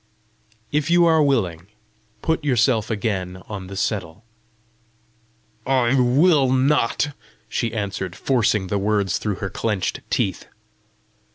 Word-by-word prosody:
"If 150 Hz, +2 st, 0 dB
you 175 Hz, 0 st, +5 dB
are 160 Hz, -2 st, +4 dB
willing, 95 Hz, -, 0 dB, 0.6 s
put 160 Hz, -1 st, 0 dB
yourself 120 Hz, -5 st, +2 dB
again 95 Hz, -5 st, -3 dB
on 100 Hz, -3 st, -6 dB
the 100 Hz, 0 st, -8 dB
settle." 100 Hz, -1 st, -3 dB, 1.4 s
"I 130 Hz, -1 st, +2 dB
will 135 Hz, +2 st, +4 dB
not," 135 Hz, +1 st, +2 dB, 0.4 s
she 115 Hz, +1 st, -2 dB
answered, 100 Hz, -4 st, -4 dB
forcing 115 Hz, -6 st, +1 dB
the 100 Hz, +2 st, -1 dB
words 100 Hz, -2 st, 0 dB
through 105 Hz, -2 st, -2 dB
her 95 Hz, 0 st, -4 dB
clenched 105 Hz, -5 st, -2 dB
teeth. -, -, -1 dB
110 Hz, 115 wpm, -22 LUFS, 100-135 Hz, 1.4 s, you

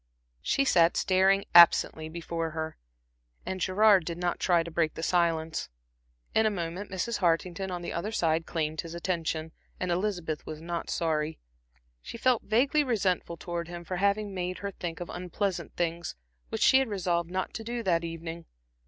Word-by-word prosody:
She 275 Hz, -, +1 dB
sat 170 Hz, -8 st, +4 dB
staring 195 Hz, +1 st, +3 dB
absently 170 Hz, -2 st, +6 dB
before 165 Hz, 0 st, -3 dB
her, 160 Hz, 0 st, -3 dB, 0.7 s
and 185 Hz, -1 st, -4 dB
Gerard 200 Hz, 0 st, +5 dB
did 170 Hz, +1 st, -4 dB
not 175 Hz, 0 st, -1 dB
try 175 Hz, -2 st, +3 dB
to 170 Hz, -, -8 dB
break 160 Hz, -1 st, 0 dB
the 160 Hz, -, -5 dB
silence. 165 Hz, -2 st, 0 dB, 0.6 s
In 220 Hz, 0 st, +4 dB
a -, -, +3 dB
moment 180 Hz, 0 st, -4 dB
Mrs. 215 Hz, +4 st, -2 dB
Hartington 175 Hz, +2 st, 0 dB
on 175 Hz, -1 st, -4 dB
his -, -, -4 dB
other 195 Hz, +6 st, -3 dB
side 165 Hz, -6 st, +1 dB
claimed 155 Hz, -2 st, -2 dB
his 165 Hz, 0 st, -8 dB
attention, 165 Hz, -2 st, -2 dB, 0.3 s
and 180 Hz, -1 st, -1 dB
Elizabeth 175 Hz, -4 st, -2 dB
was 155 Hz, -1 st, -7 dB
not 170 Hz, +1 st, -4 dB
sorry. 160 Hz, -1 st, -1 dB, 0.6 s
She -, -, -8 dB
felt 250 Hz, 0 st, +2 dB
vaguely 270 Hz, +7 st, +2 dB
resentful 190 Hz, -9 st, 0 dB
towards 170 Hz, 0 st, -5 dB
him 175 Hz, 0 st, -7 dB
for 185 Hz, +1 st, -4 dB
having 200 Hz, +1 st, +1 dB
made 180 Hz, 0 st, -3 dB
her 200 Hz, 0 st, -4 dB
think 175 Hz, -2 st, -6 dB
of 175 Hz, -, -5 dB
unpleasant 180 Hz, +2 st, -3 dB
things, 170 Hz, 0 st, -2 dB, 0.3 s
which -, -, -1 dB
she 265 Hz, -, +7 dB
had 265 Hz, -, +1 dB
resolved 175 Hz, -5 st, -1 dB
not 185 Hz, +1 st, -3 dB
to 225 Hz, -, -5 dB
do 235 Hz, +1 st, -4 dB
that 170 Hz, -4 st, +2 dB
evening. 165 Hz, 0 st, -6 dB
175 Hz, 175 wpm, -29 LUFS, 165-195 Hz, 0.7 s, she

